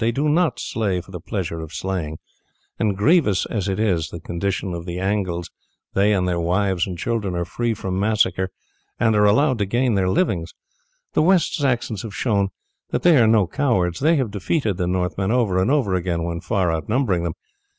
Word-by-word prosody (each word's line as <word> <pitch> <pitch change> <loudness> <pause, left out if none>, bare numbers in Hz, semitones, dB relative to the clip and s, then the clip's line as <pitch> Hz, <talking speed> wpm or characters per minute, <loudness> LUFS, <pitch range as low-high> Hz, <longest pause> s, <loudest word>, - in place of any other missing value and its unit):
They 115 +1 +2
do 140 +6 0
not 165 +2 +2
slay 100 -5 -1
for 95 - -12
the 90 - -6
pleasure 90 -2 -4
of 80 +1 -8
slaying, 85 -5 -3 0.6
and 105 -3 +1
grievous 110 - +3
as 105 -3 -2
is 95 -6 0
the 85 - -7
condition 90 +2 -3
of 85 +1 -6
the 85 0 -4
Angles 95 -3 -2 0.4
they 100 +2 +3
and 95 -3 +1
their 90 -1 0
wives 90 +1 +1
and 90 -2 -5
children 105 -3 -2
are 85 0 -1
free 115 +6 -2
from 95 -3 -3
massacre 95 -3 +1 0.5
and 110 -2 +3
are 105 0 +4
allowed 130 +3 +3
to 100 - 0
gain 120 +3 +1
their 95 -2 +1
livings. 95 - 0 0.6
The - - +3
West 180 +1 +3
Saxons 120 -7 -1
have 105 -4 -7
showed 100 -5 +1 0.4
that - - -2
they 175 -2 +6
are 115 -3 +5
no 110 -3 +4
cowards; 90 - 0
they 160 +4 +3
have 130 -8 0
defeated 105 - -1
the 90 -2 -1
Northmen 90 +1 -1
over 110 -6 +2
and 95 - +1
over 135 -9 +2
again 85 -2 -1
when 85 0 -3
far 90 0 0
outnumbering 100 - 0
them. 85 -1 -2
100 Hz, 195 wpm, -22 LUFS, 90-115 Hz, 0.6 s, they